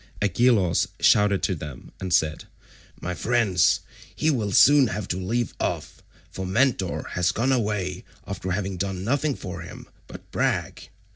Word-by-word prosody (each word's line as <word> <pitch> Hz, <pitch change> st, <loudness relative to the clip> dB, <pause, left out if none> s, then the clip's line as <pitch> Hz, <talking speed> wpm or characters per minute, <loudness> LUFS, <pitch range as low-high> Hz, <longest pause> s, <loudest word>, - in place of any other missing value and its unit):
Agelaus 100 Hz, -5 st, +2 dB
shouted 105 Hz, -2 st, +4 dB
to 95 Hz, -, +1 dB
them 75 Hz, -6 st, -8 dB
and 95 Hz, -1 st, -5 dB
said, 80 Hz, -2 st, +1 dB, 0.5 s
"My 90 Hz, -, -4 dB
friends, 105 Hz, -3 st, +2 dB, 0.3 s
he 155 Hz, -, +2 dB
will 110 Hz, -7 st, -1 dB
soon 140 Hz, +5 st, +6 dB
have 105 Hz, -3 st, -4 dB
to 90 Hz, -, -1 dB
leave 115 Hz, +6 st, -2 dB
off, -, -, -3 dB, 0.3 s
for 95 Hz, -, -5 dB
Mentor 95 Hz, -1 st, 0 dB
has 90 Hz, -1 st, +1 dB
gone 125 Hz, +4 st, 0 dB
away 105 Hz, -7 st, -1 dB, 0.2 s
after 95 Hz, -, -5 dB
having 95 Hz, 0 st, -2 dB
done 95 Hz, 0 st, -3 dB
nothing 140 Hz, +5 st, 0 dB
for 90 Hz, -2 st, -7 dB
him 85 Hz, -, -10 dB, 0.2 s
but -, -, -12 dB
brag. -, -, -2 dB
100 Hz, 150 wpm, -24 LUFS, 90-120 Hz, 0.5 s, soon